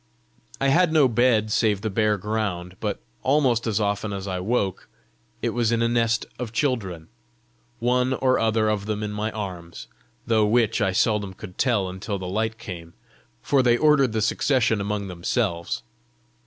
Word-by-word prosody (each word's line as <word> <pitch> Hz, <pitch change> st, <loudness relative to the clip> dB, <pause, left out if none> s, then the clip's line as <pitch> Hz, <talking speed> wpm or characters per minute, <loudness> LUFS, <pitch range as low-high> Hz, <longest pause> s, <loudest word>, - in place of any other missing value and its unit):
I 135 Hz, -, +2 dB
had 170 Hz, +4 st, +4 dB
no 155 Hz, -4 st, +5 dB
bed 115 Hz, -3 st, +2 dB
save 105 Hz, -2 st, +2 dB
the 110 Hz, -1 st, -2 dB
bare 105 Hz, +1 st, +2 dB
ground, 95 Hz, -3 st, -3 dB
but -, -, -3 dB, 0.2 s
almost 130 Hz, -5 st, +2 dB
as 110 Hz, -2 st, +1 dB
often 100 Hz, 0 st, -1 dB
as 100 Hz, 0 st, -5 dB
I 90 Hz, -1 st, -2 dB
woke, 100 Hz, -1 st, -1 dB, 0.5 s
it -, -, +1 dB
was 120 Hz, -2 st, 0 dB
in 115 Hz, 0 st, +2 dB
a -, -, +3 dB
nest 115 Hz, -1 st, +1 dB
of 120 Hz, -3 st, -4 dB
children 110 Hz, -, -2 dB, 0.7 s
one 125 Hz, +2 st, +1 dB
or 130 Hz, 0 st, +2 dB
other 110 Hz, -1 st, +2 dB
of 105 Hz, -1 st, -1 dB
them 105 Hz, 0 st, -2 dB
in 105 Hz, -, -3 dB
my 105 Hz, +1 st, -2 dB
arms, 90 Hz, -5 st, -7 dB, 0.4 s
though 110 Hz, -2 st, +3 dB
which 115 Hz, +1 st, +2 dB
I 95 Hz, -1 st, +2 dB
seldom 100 Hz, 0 st, 0 dB
could 90 Hz, -1 st, -11 dB
tell 115 Hz, -7 st, +2 dB
until 95 Hz, +3 st, -4 dB
the 95 Hz, -, -6 dB
light 110 Hz, +4 st, -2 dB
came, 90 Hz, -8 st, -9 dB, 0.5 s
for 140 Hz, -2 st, +3 dB
they 120 Hz, -1 st, +3 dB
ordered 150 Hz, -4 st, +4 dB
the 110 Hz, -1 st, 0 dB
succession 115 Hz, -2 st, +1 dB
among 100 Hz, 0 st, -2 dB
themselves. 85 Hz, -1 st, -2 dB
110 Hz, 170 wpm, -24 LUFS, 100-120 Hz, 0.7 s, no